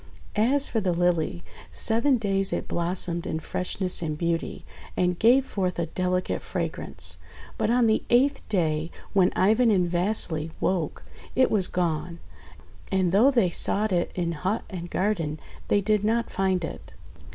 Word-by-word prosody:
As 265 +7 +2
for 225 - -1
the 185 -3 +1
Lily, 170 - 0 0.3
seven 235 - +1
days 195 -3 0
it - - -2
blossomed 170 0 -1
in 160 - -2
freshness 180 +3 -1
and 155 -2 -3
beauty, 170 +1 -2 0.3
and 180 -1 +1
gave 255 +4 +5
forth 185 -6 -2
a 170 - 0
delicate 180 +2 -1
fragrance; - - -3 0.4
but - - 0
on 240 0 +3
the 220 -1 +3
eighth 270 +4 +3
day, 160 -5 0 0.2
when 190 -2 +4
Ivan 220 +5 +4
and 185 -4 +3
Vasily 175 -3 0
woke, 175 -5 -1 0.3
it 260 +1 +3
was 195 -4 +2
gone. 170 -1 -2 0.7
And 190 -2 +2
though 215 +8 +5
they 235 -10 +2
sought 210 +4 +1
it 175 -1 0
in 170 -2 -1
hut 185 +7 -2
and 175 -2 -6
garden, 170 -7 -1 0.3
they 205 - +3
did 210 0 +1
not 230 +2 0
find 190 -3 0
it. - - -9
185 Hz, 155 wpm, -26 LUFS, 170-215 Hz, 0.7 s, gave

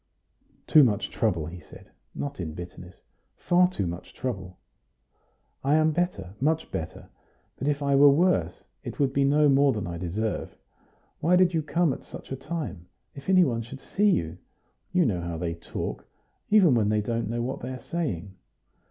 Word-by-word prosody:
"Too 155 - +7
much 105 -6 +1
trouble," 90 -9 0
he 85 +3 -8
said, - - -15 0.2
not 145 -4 -5
in 80 -3 -4
bitterness 90 +1 -10 0.3
"far 180 +1 +3
too 140 - -3
much 85 +1 -6
trouble. 95 -8 -5 1.1
I 140 +3 +3
am 155 0 +4
better, 175 - -2
much 160 +3 0
better; 80 - -6 0.5
but 135 - -2
if 145 0 0
I 140 -1 +2
were 140 +1 +8
worse, 140 - +2 0.2
it - - -7
would 135 -2 +1
be 140 - +2
no 145 +2 +4
more 140 0 +4
than 105 -3 -3
I 85 -1 -5
deserve. 100 +5 -3 0.6
Why 175 +4 +3
did 180 -1 +4
you 160 - +1
come 160 0 +1
at - - -8
such - - -11
a - - -1
time? 130 - -5 0.3
If 140 +5 -9
any 185 -1 +6
one 115 -7 0
should 125 +4 -9
see 205 +8 +1
you? 85 - 0 0.5
You 180 -1 +3
know 95 -8 0
how 85 -1 -4
they 85 0 -2
talk, 85 0 -6 0.4
even 195 -9 +6
when 110 -4 +2
they 105 0 +2
don't 115 +1 -2
know 120 +1 -1
what 130 +2 -3
they 125 - -6
are 130 0 -6
saying." 105 - -3
130 Hz, 185 wpm, -27 LUFS, 90-155 Hz, 1.1 s, were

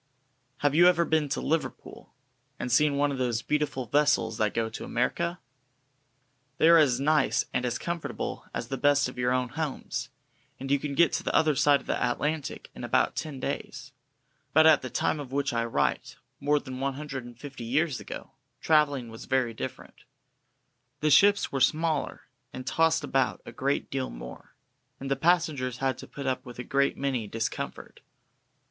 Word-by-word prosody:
Have 145 -1 +2
you 175 +3 +7
ever 170 -1 +4
been 155 -3 +1
to 140 - -1
Liverpool, 160 +1 -3 0.5
and 125 - -4
seen 145 +3 +3
one 145 0 +2
of 135 - -4
those 120 -2 -1
beautiful 150 -4 -1
vessels 145 -4 +2
that 105 -1 +2
go 115 -1 +1
to 110 - -7
America? 170 +8 -1 1.2
They 160 - +5
are 170 0 +8
as 130 -5 +3
nice 150 0 +2
and 125 - 0
as 120 -1 -1
comfortable 170 -1 -4
as 115 - -5
the 135 - -3
best 145 -1 +3
of 125 0 -9
your 125 0 +1
own 125 -1 0
homes, 130 -4 -4 0.5
and 135 +1 -5
you 140 - +3
can 140 0 -4
get 170 +2 +4
to - - -1
the - - -1
other 155 -2 +4
side 140 0 +4
of - - -18
the - - -2
Atlantic 145 +4 -2
in - - -9
about - - +1
ten 150 -4 -5
days. - - -5 0.6
But 155 +1 +6
at 160 -1 +6
the 130 - -5
time 150 - 0
of 135 -3 -7
which 140 -1 -1
I 115 0 0
write, 115 - -1 0.2
more 150 +1 +2
than 130 -2 -8
one 135 0 -1
hundred 135 -3 -6
and 120 -1 -12
fifty 135 -3 -8
years 140 +3 0
ago, - - -8 0.3
travelling 145 -6 +2
was 115 0 -10
very 130 -3 +1
different. - - -8 1.0
The 155 0 +2
ships 200 +7 +5
were 140 - -2
much 130 - +7
smaller, 160 -2 -2 0.3
and 130 - -7
tossed 160 +3 +2
about 135 -1 0
a - - -8
great 140 +2 -1
deal 135 -1 -2
more, - - -10 0.4
and 135 0 -5
the - - +3
passengers 150 -5 +1
had 135 0 -1
to - - -9
put 140 - -8
up 130 -1 -1
with 125 -3 -11
a 125 - -5
great 140 +2 +1
many 130 -6 -1
discomforts. 115 +2 -5
140 Hz, 190 wpm, -28 LUFS, 125-150 Hz, 1.2 s, are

